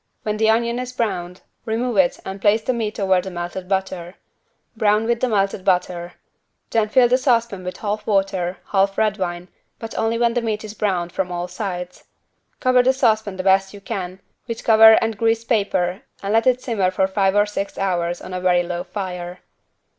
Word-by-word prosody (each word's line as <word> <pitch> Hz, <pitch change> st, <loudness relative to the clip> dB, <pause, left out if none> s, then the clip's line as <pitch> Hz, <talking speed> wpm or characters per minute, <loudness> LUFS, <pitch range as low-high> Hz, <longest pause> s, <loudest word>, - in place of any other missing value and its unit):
When 210 Hz, 0 st, -2 dB
the 220 Hz, 0 st, +3 dB
onion 235 Hz, +2 st, +1 dB
is 250 Hz, 0 st, -5 dB
browned, 180 Hz, -7 st, -3 dB, 0.2 s
remove 235 Hz, +2 st, -2 dB
it 185 Hz, -2 st, +3 dB
and 190 Hz, 0 st, -6 dB
place 215 Hz, +2 st, +3 dB
the 255 Hz, -, 0 dB
meat 220 Hz, -3 st, -3 dB
over 190 Hz, -2 st, +3 dB
the 190 Hz, -, -7 dB
melted 175 Hz, +1 st, -6 dB
butter. 190 Hz, -2 st, -2 dB, 0.6 s
Brown 215 Hz, 0 st, +2 dB
with 235 Hz, 0 st, 0 dB
melted 200 Hz, -5 st, 0 dB
butter. 180 Hz, -1 st, 0 dB, 0.6 s
Then 220 Hz, -2 st, +1 dB
fill 250 Hz, +2 st, +5 dB
the 250 Hz, +2 st, +3 dB
saucepan 235 Hz, -7 st, +1 dB
with 180 Hz, 0 st, -6 dB
half 210 Hz, 0 st, -4 dB
water, 195 Hz, -3 st, 0 dB
half 195 Hz, 0 st, +2 dB
red 215 Hz, -1 st, +1 dB
wine, 175 Hz, -1 st, -3 dB, 0.3 s
but 225 Hz, -1 st, -8 dB
only 225 Hz, +1 st, 0 dB
when 235 Hz, 0 st, +2 dB
the 245 Hz, -, 0 dB
meat 220 Hz, -2 st, -2 dB
is 215 Hz, -1 st, -7 dB
browned 185 Hz, -5 st, -1 dB
from 180 Hz, 0 st, -2 dB
all 175 Hz, 0 st, -3 dB
sides. 180 Hz, -1 st, -6 dB, 0.5 s
Cover 255 Hz, 0 st, +4 dB
the 260 Hz, +2 st, +3 dB
saucepan 220 Hz, -6 st, +1 dB
the 185 Hz, -, -3 dB
best 190 Hz, +1 st, +2 dB
you -, -, -10 dB
can, 190 Hz, -3 st, -5 dB, 0.3 s
with 230 Hz, -1 st, -5 dB
cover 220 Hz, 0 st, +8 dB
and 225 Hz, -2 st, -2 dB
greased 230 Hz, 0 st, +1 dB
paper 195 Hz, -4 st, 0 dB, 0.2 s
and 200 Hz, +1 st, -1 dB
let 225 Hz, +2 st, +3 dB
it 255 Hz, 0 st, +2 dB
simmer 205 Hz, -7 st, +1 dB
for 190 Hz, +1 st, +1 dB
five 195 Hz, 0 st, +1 dB
or 205 Hz, 0 st, +4 dB
six 200 Hz, -1 st, -5 dB
hours 175 Hz, -3 st, -1 dB
on 185 Hz, -, -8 dB
a 180 Hz, -, -3 dB
very 180 Hz, -1 st, +3 dB
low 175 Hz, 0 st, -4 dB
fire. 180 Hz, -2 st, -6 dB
200 Hz, 195 wpm, -21 LUFS, 185-225 Hz, 0.6 s, cover